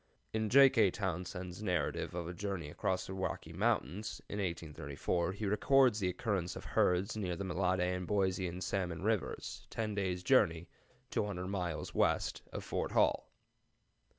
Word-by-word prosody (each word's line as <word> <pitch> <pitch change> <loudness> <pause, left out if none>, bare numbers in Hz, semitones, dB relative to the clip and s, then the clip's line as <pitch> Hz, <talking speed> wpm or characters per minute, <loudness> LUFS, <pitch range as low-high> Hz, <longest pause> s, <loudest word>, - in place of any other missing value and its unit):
[In 110 -1 0
J. 135 +3 +9
K. 110 -6 +5
Townsend's 90 -1 -4
"Narrative 90 -3 -1
of 85 -2 -3
a 90 - -4
Journey 90 -5 -4
across 95 +3 -1
the 95 - -6
Rocky 95 -2 -3
Mountains," 90 - 0
in 105 - -4
1834, 85 0 -2
he 105 +2 -4
records 120 +3 +4
the 95 -3 +1
occurrence 95 -4 -1
of - - -8
herds 90 +4 +2
near 95 -5 -2
the 100 - -4
Mellade 95 0 +1
and 90 0 -1
Boise 95 -2 +1
and 90 +2 -5
Salmon 90 -3 -2
Rivers, 110 -2 -2
ten 110 -2 -2
days' 95 -3 -1
journey 85 -9 +3 0.4
200 95 -3 -1
miles 90 -5 -3
west - - +1
of - - -5
Fort - - -2
Hall. - - +3
95 Hz, 155 wpm, -34 LUFS, 90-105 Hz, 0.4 s, J